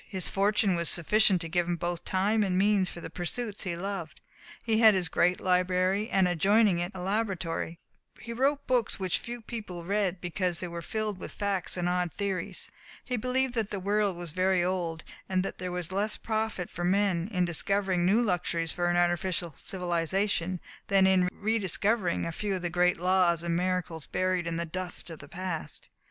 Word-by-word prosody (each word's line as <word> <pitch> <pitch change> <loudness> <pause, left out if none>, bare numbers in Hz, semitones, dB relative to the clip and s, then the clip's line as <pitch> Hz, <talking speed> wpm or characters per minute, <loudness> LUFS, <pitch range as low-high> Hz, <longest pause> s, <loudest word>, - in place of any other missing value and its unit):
His 190 -3 0
fortune 200 0 +2
was 170 -1 0
sufficient 190 +1 +3
to 165 - -3
give 175 +1 0
him 175 - 0
both 175 0 -3
time 205 +4 +2
and 190 -3 +1
means 195 -1 +3
for 170 - -9
the - - -7
pursuits 205 +5 -3
he 170 -2 -2
loved. 185 -4 -5 0.4
He 220 -1 +2
had 220 -3 +7
his 180 -3 +1
great 180 +1 +2
library, 185 +3 +1
and 190 -4 +3
adjoining 195 +2 +3
it 175 +2 -2
a - - -6
laboratory. 185 -4 -2 0.4
He 235 - -6
wrote 280 +4 +1
books 245 -6 +1
which 185 -2 0
few 240 0 -7
people 210 -7 -7
read 195 -1 0
because 175 0 -1
they 180 - -3
were 170 0 -6
filled 210 +2 -3
with - - -7
facts 200 -3 -2
and 175 0 0
odd 180 -1 0
theories. 195 -4 -3 0.3
He 250 - -1
believed 255 +2 0
that 225 -4 -1
the 200 - -3
world 200 -1 +1
was 175 -2 -5
very 185 +1 +2
old, 175 -3 -2 0.3
and 185 -1 +1
that - - -5
there 180 0 -3
was 180 -1 -4
less 205 +3 0
profit 220 -5 -2
for 175 - -5
men 185 -1 +2
in 180 -3 +2
discovering 185 +1 +1
new 205 +7 +4
luxuries 175 -4 0
for 175 -1 0
an 175 - +2
artificial 175 0 +1
civilization 180 +2 -1 0.3
than 195 -1 +4
in 185 -1 +4
re 220 +4 0
discovering 200 -1 +1
a 165 - -2
few 200 +4 -2
of 185 - -5
the 175 - -1
great 180 +1 +3
laws 180 -2 +3
and 170 -1 0
miracles 180 -3 -1
buried 185 -2 0
in 165 0 -2
the 170 - -1
dust 180 0 -4
of 160 - -8
the 140 - -11
past. 180 -2 -5
185 Hz, 195 wpm, -29 LUFS, 175-205 Hz, 0.4 s, had